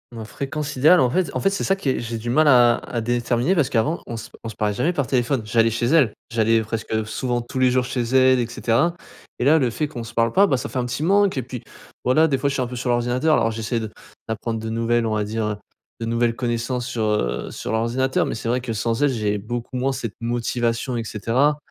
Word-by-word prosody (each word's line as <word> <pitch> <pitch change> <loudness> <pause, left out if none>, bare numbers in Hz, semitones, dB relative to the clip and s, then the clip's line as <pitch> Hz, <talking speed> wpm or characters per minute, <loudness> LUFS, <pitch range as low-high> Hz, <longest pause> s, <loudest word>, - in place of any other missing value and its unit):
Ma 115 - -6
fréquence 140 +6 -5
idéale 155 +6 +6
en 125 - +3
fait 185 +6 0
en - - -1
fait, 195 - +3
c'est 195 - -2
ça 195 - +2
qui 195 -9 -2
est - - 0
j'ai 115 -1 -4
du 120 +2 -5
mal 155 +5 +3
à 120 -3 +6
à 120 - -4
déterminer 120 +7 0
parce 150 -6 +2
qu'avant 140 +7 0
on 115 - -5
se 115 0 -8
p - - -17
on - - -7
se 110 - -7
parlait 105 -1 0
jamais 170 - 0
par 140 -5 0
téléphone, 125 +1 0
j'allais 115 +1 +2
chez 120 +1 -1
elle. 140 -8 +4 0.2
J'allais 115 0 +3
presque 110 0 -3
souvent 120 +2 -2
tous 120 +2 -6
les 130 -1 +4
jours 130 0 +2
chez 125 -1 -2
elle 130 +1 +4
et 120 - 0
cetera. 120 +8 +1 0.4
Et - - -2
là 155 +4 +5
le 125 - +1
fait 150 +6 -2
qu'on 120 -6 -6
se 120 - -10
parle 115 -1 +2
pas, 200 +1 +5
bah, 135 - +2
ça - - -4
fait 130 - -3
un 125 - -1
petit 125 +5 -3
manque 200 +2 +3
et 130 - -1
puis 125 -1 -7 0.4
voilà 155 +6 +4
des 135 - +1
fois, 140 - -1
je 140 - 0
suis 135 - -1
un 125 - -1
peu 125 0 -7
sur 125 0 -3
l'ordinateur 125 +6 +1
alors 115 - +2
j'essaie 115 +1 -2
de 110 - -5 0.4
d'apprendre 110 0 -3
de 110 - -4
nouvelles, 115 +1 +1
on 110 -1 0
va 105 - 0
dire, 110 +1 -2
heu, 105 -1 -2 0.4
de 115 - -3
nouvelles 115 0 +1
connaissances 120 0 -2
sur, 120 -3 -2
heu, 105 - -1
sur - - -5
l'ordinateur, 120 +4 +1
mais - - -3
c'est 115 - -5
vrai 125 +2 +1
que 120 -2 -5
sans 115 +4 -1
elle, 145 - +4
j'ai 105 -4 -1
beaucoup 120 +4 -5
moins 130 +2 0
cette 125 -5 -4
motivation 120 +1 -1
et 115 - -2
cetera. 120 +8 +1
120 Hz, 265 wpm, -22 LUFS, 115-130 Hz, 0.4 s, idéale